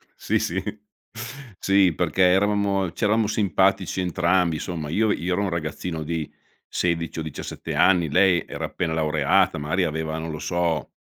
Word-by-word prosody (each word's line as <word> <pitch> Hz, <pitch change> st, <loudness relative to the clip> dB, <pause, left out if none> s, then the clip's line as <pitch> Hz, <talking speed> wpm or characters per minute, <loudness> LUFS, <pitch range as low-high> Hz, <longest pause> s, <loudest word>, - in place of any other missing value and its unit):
Sì, -, -, 0 dB
sì. 95 Hz, +3 st, -1 dB, 1.0 s
Sì, 95 Hz, -3 st, +3 dB
perché 90 Hz, +3 st, -1 dB
eravamo 100 Hz, 0 st, +3 dB
c'eravamo 110 Hz, +2 st, +1 dB
simpatici 95 Hz, -2 st, +1 dB
entrambi 90 Hz, -1 st, +1 dB
insomma 80 Hz, -3 st, -5 dB
io 105 Hz, +6 st, +2 dB
io 90 Hz, -1 st, -1 dB
ero 95 Hz, -, 0 dB
un 100 Hz, -, 0 dB
ragazzino 80 Hz, 0 st, -4 dB
di 80 Hz, -1 st, -3 dB, 0.4 s
16 85 Hz, -2 st, -1 dB
o -, -, -2 dB
17 80 Hz, -2 st, -6 dB
anni, 90 Hz, -4 st, +4 dB
lei 90 Hz, +1 st, +4 dB
era -, -, -4 dB
appena 85 Hz, -3 st, -3 dB
laureata, 75 Hz, -2 st, +2 dB
magari 80 Hz, +6 st, 0 dB
aveva, 80 Hz, 0 st, -3 dB
non 80 Hz, +1 st, -5 dB
lo 75 Hz, -, -6 dB
so, 80 Hz, 0 st, -1 dB
85 Hz, 150 wpm, -24 LUFS, 80-95 Hz, 1.0 s, anni